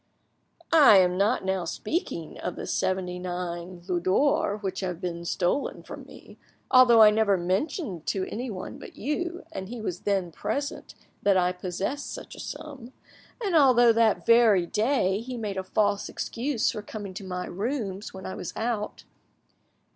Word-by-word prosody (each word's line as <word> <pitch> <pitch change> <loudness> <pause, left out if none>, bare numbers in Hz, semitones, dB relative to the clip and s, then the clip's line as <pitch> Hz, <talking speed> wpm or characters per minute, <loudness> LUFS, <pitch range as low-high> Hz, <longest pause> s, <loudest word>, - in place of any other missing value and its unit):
"I 290 -10 +8
am 180 -1 +4
not 200 +2 +1
now 190 -1 0
speaking 170 - -4
of 180 - -4
the - - -6
seventy 180 -1 -1
nine 175 0 -5
Louis 180 -2 0
d'or 205 +3 +2
which 195 -3 -4
have 180 -3 -3
been 170 -1 -4
stolen 175 +10 -1
from - - -9
me, - - -15 0.3
although 240 -3 +8
I 210 - +8
never 210 -2 +3
mentioned 185 - -2
to 190 -1 0
anyone 225 -5 -6
but - - -11
you, 345 - -3
and 190 +1 -6
he 240 0 -6
was 180 -5 -4
then 195 -4 -1
present, 245 - -4 0.3
that 200 -2 +3
I 180 0 +3
possessed 185 +9 -4
such - - -8
a - - -11
sum, 270 -5 -8 0.5
and 380 -4 0
although 245 -6 +6
that 220 -6 +2
very 225 -6 +5
day 210 -1 +1
he 250 +2 -6
made 210 -4 -4
a 190 - -2
false 205 +1 0
excuse 245 -1 -1
for 215 - -5
coming 205 -2 -7
to 195 +2 -7
my 180 -1 -4
rooms 205 -1 -3
when 190 0 -9
I 190 - -4
was - - -6
out. 220 -2 -3
200 Hz, 165 wpm, -27 LUFS, 185-240 Hz, 0.5 s, I